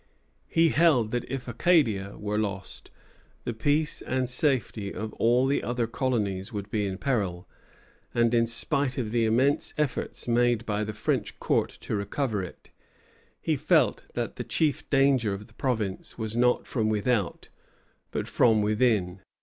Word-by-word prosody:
He 165 0 +3
held 145 -10 +3
that 120 -1 -2
if 135 -2 -4
Acadia 115 - +2
were 105 0 -2
lost, 100 -2 -4 0.5
the 120 - -3
peace 145 +7 0
and 130 0 -1
safety 125 -6 0
of 110 0 -5
all 120 +3 +3
the 140 +1 +1
other 120 -1 -1
colonies 110 -6 -1
would 105 -1 -6
be 105 -2 0
in 95 -1 -4
peril; 100 -9 -1 0.6
and 120 0 +2
in 115 -1 +3
spite 135 +3 0
of 115 -5 -2
the 115 -1 +2
immense 130 +6 +2
efforts 150 -4 -2
made 120 -1 +2
by 105 -1 -1
the 110 0 -4
French - - -2
court - - +1
to - - -3
recover 105 +1 -1
it, 90 - -10 0.7
he - - 0
felt - - +2
that - - -3
the - - -3
chief 155 -4 0
danger 135 -7 +3
of 105 +2 -9
the 110 - -21
province 110 -7 -3
was 110 -1 -4
not 125 +1 +3
from 110 -4 0
without, 105 -2 0 0.6
but - - -3
from 110 -3 +3
within. 105 -4 +1
115 Hz, 160 wpm, -27 LUFS, 105-130 Hz, 0.7 s, He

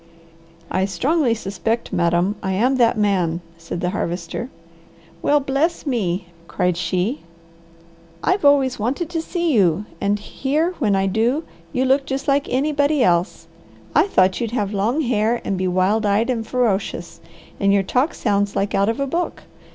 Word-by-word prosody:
"I 185 +1 +1
strongly 250 - +1
suspect 220 +2 -3
madam, 175 +3 +1
I 190 0 -1
am 250 +7 +2
that 235 -2 +3
man," 185 -6 +1 0.2
said 165 +1 -6
the 180 - 0
Harvester. 175 +4 -3 0.7
"Well 295 0 +3
bless 280 +6 -1
me!" 190 - -1 0.2
cried 180 0 0
she. 185 - -1 1.0
"I've 375 -1 +1
always 275 -4 +4
wanted 275 +10 -2
to 330 -2 -1
see 340 -1 -1
you 195 -3 +3 0.2
and 200 +1 +1
here 295 - -1
when 210 -8 +2
I 195 0 +1
do, 230 - +1 0.3
you 260 -2 0
look 270 +1 +2
just 270 0 -3
like 280 0 +2
anybody 285 +1 +2
else. 175 0 +1 0.5
I - - +4
thought 185 - +2
you'd 230 - -1
have 205 -1 -1
long 220 +10 +1
hair, 235 -3 +1
and 195 - -1
be 185 0 -1
wild 185 +4 +2
eyed 210 +4 +2
and 225 -3 -3
ferocious. 205 -8 -1 0.4
And 200 0 +3
your 200 -1 +3
talk 255 - 0
sounds 205 -2 0
like 200 - -1
out 200 +2 +2
of 230 - -2
a 275 - +1
book. 340 +6 -3
220 Hz, 165 wpm, -21 LUFS, 190-275 Hz, 1.0 s, always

